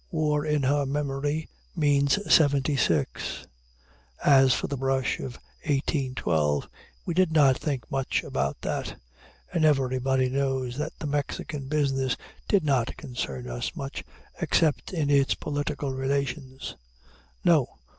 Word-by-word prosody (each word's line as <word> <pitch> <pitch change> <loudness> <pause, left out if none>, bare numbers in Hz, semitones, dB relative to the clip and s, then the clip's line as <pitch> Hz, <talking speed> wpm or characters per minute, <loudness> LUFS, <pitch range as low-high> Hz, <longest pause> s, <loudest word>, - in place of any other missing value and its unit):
War 150 -4 +1
in 150 -2 +1
her 140 +1 +2
memory 145 +2 -1 0.3
means 140 +2 +3 0.2
'76. 135 - +2 0.8
As 135 -2 +6
for - - +1
the 140 - -3
brush 135 -1 0
of 125 -2 -5 0.3
1812, 130 - 0 0.4
"we 170 - -1
did 180 -1 +3
not 145 -4 +5
think 140 -6 -2
much 135 -1 0
about 70 +1 -2
that"; - - -3 0.5
and 170 -3 +1
everybody 130 -3 +2
knows 130 -2 -1
that 150 - -3
the - - -6
Mexican 145 -1 -3
business 135 -3 +1 0.3
did 200 -4 +3
not 130 -5 +1
concern 65 - -5
us - - -4
much, - - -5 0.4
except 155 -3 +2
in 155 -6 0
its 140 -1 +4
political 145 -1 -3
relations. 135 0 -3 0.7
No! - - +5
135 Hz, 125 wpm, -27 LUFS, 130-150 Hz, 0.8 s, As